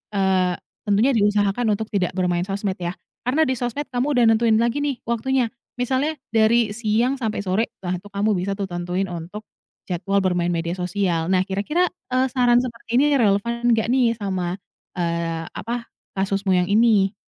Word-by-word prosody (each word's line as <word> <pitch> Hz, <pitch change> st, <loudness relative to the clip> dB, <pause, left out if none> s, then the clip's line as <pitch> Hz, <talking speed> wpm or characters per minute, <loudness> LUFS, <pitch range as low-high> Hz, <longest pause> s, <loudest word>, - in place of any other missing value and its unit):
eee, 190 Hz, -2 st, +2 dB, 0.3 s
tentunya 210 Hz, +6 st, +3 dB
diusahakan 210 Hz, +1 st, +2 dB
untuk 220 Hz, +1 st, -5 dB
tidak 185 Hz, -3 st, 0 dB
bermain 180 Hz, -1 st, +1 dB
sosmed 195 Hz, -1 st, -2 dB
ya, 175 Hz, 0 st, -3 dB, 0.3 s
karena 290 Hz, +6 st, +3 dB
di 260 Hz, -, +1 dB
sosmed 245 Hz, +4 st, -2 dB
kamu 250 Hz, +2 st, 0 dB
udah 245 Hz, -, +5 dB
nentuin 225 Hz, 0 st, +4 dB
lagi 235 Hz, +4 st, +1 dB
nih 285 Hz, -3 st, -1 dB
waktunya. 235 Hz, +1 st, 0 dB, 0.3 s
Misalnya 260 Hz, +5 st, 0 dB, 0.2 s
dari 225 Hz, 0 st, +3 dB
siang 235 Hz, +4 st, +1 dB
sampai 220 Hz, -4 st, -2 dB
sore 200 Hz, +4 st, 0 dB, 0.2 s
lah 180 Hz, +1 st, -1 dB
tuh 205 Hz, -, -13 dB
kamu 205 Hz, +2 st, +1 dB
bisa 190 Hz, +2 st, -1 dB
tuh 200 Hz, -, -2 dB
tentuin 175 Hz, +2 st, -2 dB
untuk 175 Hz, +5 st, -7 dB, 0.5 s
jadwal 195 Hz, +3 st, -1 dB
bermain 175 Hz, -2 st, +1 dB
media 170 Hz, 0 st, -2 dB
sosial. 180 Hz, -2 st, -1 dB
Nah, 185 Hz, -1 st, +3 dB
kira-kira, 210 Hz, -, 0 dB, 0.3 s
eee, 255 Hz, +1 st, +3 dB
saran 245 Hz, -2 st, +4 dB
seperti 235 Hz, -1 st, -3 dB
ini 290 Hz, +2 st, +4 dB
relevan 235 Hz, +2 st, +1 dB
enggak 220 Hz, 0 st, 0 dB
nih 245 Hz, -3 st, +3 dB
sama, 185 Hz, -4 st, -2 dB, 0.4 s
eee, 170 Hz, -1 st, -1 dB
apa, 235 Hz, 0 st, -4 dB, 0.3 s
kasusmu 195 Hz, 0 st, 0 dB
yang 180 Hz, -, +2 dB
ini? 210 Hz, -2 st, +4 dB
210 Hz, 165 wpm, -22 LUFS, 185-235 Hz, 0.5 s, udah